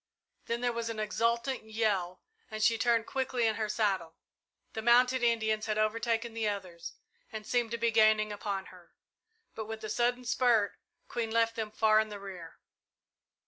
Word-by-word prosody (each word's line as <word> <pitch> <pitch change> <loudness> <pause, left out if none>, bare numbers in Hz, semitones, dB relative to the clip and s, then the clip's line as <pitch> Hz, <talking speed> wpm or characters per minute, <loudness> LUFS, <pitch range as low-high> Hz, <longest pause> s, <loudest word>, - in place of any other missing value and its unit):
Then 235 +1 -2
there 245 -1 0
was 230 0 -3
an 225 -1 -4
exultant 235 +4 0
yell 210 -5 -1 0.3
and 215 -1 -3
she 230 +1 +4
turned 230 0 +2
quickly 255 -3 -1
in 220 - +2
her 215 -1 -2
saddle. 195 -7 0 0.6
The 220 - -4
mounted 250 +2 +4
Indians 220 -2 +1
had 215 -1 -1
overtaken 230 +2 0
the 225 -2 0
others 185 -4 -6 0.4
and 215 -1 -7
seemed 240 -1 0
to 235 - -3
be 235 0 +1
gaining 215 -1 +4
upon 200 -2 -4
her, 180 -2 -18 0.6
but 220 - -5
with 220 0 -7
a 215 - -4
sudden 245 +2 0
spurt, 240 -4 +3 0.4
Queen 230 -2 -3
left 230 0 +1
them 220 -2 -3
far 215 0 +3
in 220 0 0
the 205 -1 -7
rear. 185 -4 -9
220 Hz, 175 wpm, -31 LUFS, 215-235 Hz, 0.6 s, she